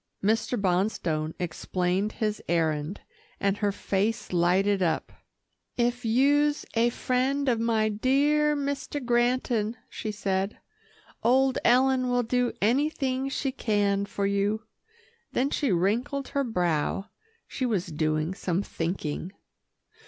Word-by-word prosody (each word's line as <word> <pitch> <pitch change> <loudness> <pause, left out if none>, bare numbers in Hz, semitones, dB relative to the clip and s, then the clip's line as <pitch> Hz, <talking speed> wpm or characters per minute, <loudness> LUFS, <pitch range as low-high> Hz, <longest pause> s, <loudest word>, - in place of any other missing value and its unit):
Mr. 225 +3 +1
Bonstone 175 -5 0
explained 180 +3 -1
his 215 -1 -2
errand, 160 +1 0 0.4
and 200 0 +1
her 205 -1 +1
face 200 +2 -1
lighted 190 +3 +3
up. 170 -3 0 0.6
"If 245 +1 0
you'se 290 +6 +3
a 235 +1 +3
friend 260 +4 0
of 235 -3 +2
my 225 -1 +2
dear 285 +7 +2
Mister 285 0 -3
Granton," 240 -2 +1
she 215 - -4
said, 195 -1 -2 0.6
"old 260 +2 +3
Ellen 255 +1 +4
will 245 0 +2
do 245 +1 +1
anything 270 +2 +1
she 275 0 -1
can 205 -5 0
for 200 - -2
you." 200 +2 0 0.7
Then 270 +3 +1
she 280 -7 +1
wrinkled 235 - 0
her 280 - 0
brow. 180 - -1 0.4
She 255 - -2
was 205 -7 0
doing 155 +1 -1
some 185 0 -1
thinking. 165 -1 -3
220 Hz, 120 wpm, -27 LUFS, 190-255 Hz, 0.7 s, Ellen